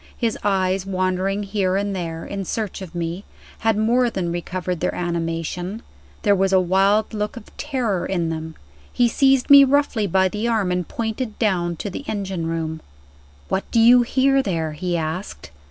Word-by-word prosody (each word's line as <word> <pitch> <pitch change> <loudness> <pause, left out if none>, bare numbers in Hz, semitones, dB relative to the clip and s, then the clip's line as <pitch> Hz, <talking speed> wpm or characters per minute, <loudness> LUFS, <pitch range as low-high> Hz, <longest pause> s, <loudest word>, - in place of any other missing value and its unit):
His 230 -3 0
eyes 190 -2 +1
wandering 185 +1 -1
here 195 -2 0
and 200 0 -1
there, 165 -2 -4
in 200 -1 -4
search 210 +1 -4
of 180 -2 -9
me, 170 +3 -3 0.4
had 225 -2 +1
more 240 +3 +3
than 180 -6 -3
recovered 180 0 -3
their 180 - -1
animation 175 +4 -3 0.4
there 205 -2 +4
was 195 0 +1
a 190 - +5
wild 195 +5 +2
look 210 +2 -3
of 220 - -12
terror 250 -11 -2
in 175 -4 -1
them. 160 0 -5 0.4
He 245 - +3
seized 270 +2 +3
me 280 0 +11
roughly 270 -6 +2
by 190 +1 +3
the 210 +5 -2
arm 215 -6 +1
and 180 -1 -1
pointed 225 0 -4
down 175 -6 0
to 200 +5 -5
the 230 - -6
engine 190 -5 -3
room. 160 -1 -3 0.7
"What 195 - -2
do 230 - +2
you 240 +2 +7
hear 270 +3 +2
there?" 165 -8 -2
he 175 +3 -2
asked. 155 - -5
195 Hz, 175 wpm, -22 LUFS, 175-220 Hz, 0.7 s, me